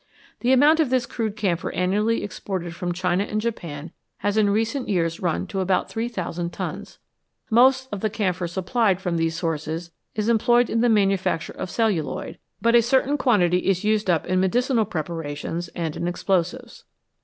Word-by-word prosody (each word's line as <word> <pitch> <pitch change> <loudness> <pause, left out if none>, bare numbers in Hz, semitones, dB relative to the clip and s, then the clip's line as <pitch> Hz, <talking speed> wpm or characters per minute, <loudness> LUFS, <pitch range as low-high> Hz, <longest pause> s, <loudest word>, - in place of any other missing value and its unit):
The 245 - +1
amount 295 +5 +5
of 310 -5 +3
this 255 -1 +1
crude 220 -3 -3
camphor 190 -6 -1
annually 210 +5 +1
exported 185 -4 -5
from 175 +1 -3
China 180 +2 0
and 215 +1 -2
Japan 170 -9 -5 0.3
has 205 0 -1
in 215 -2 +3
recent 225 +6 0
years 165 -4 0
run 175 0 -1
to 195 +1 -4
about 185 0 0
3000 185 -7 -3
tons. - - -6 0.5
Most 260 +3 +5
of 205 - -3
the 215 - +1
camphor 185 -4 -1
supplied 190 +3 +1
from 180 -3 -2
these 165 0 0
sources 165 +1 -3 0.2
is 215 0 -1
employed 240 +1 +3
in 225 - +1
the 240 - +3
manufacture 195 -5 +1
of - - -5
celluloid, 210 -7 -1 0.2
but 230 0 +2
a 240 - +7
certain 265 +4 +2
quantity 180 -11 +3
is 195 0 +1
used 210 -2 +1
up 170 -3 +2
in 185 +1 +1
medicinal 235 +4 +2
preparations 165 -1 -4
and 165 -3 -3
in 170 - -3
explosives. 175 0 -2
195 Hz, 170 wpm, -23 LUFS, 175-230 Hz, 0.5 s, a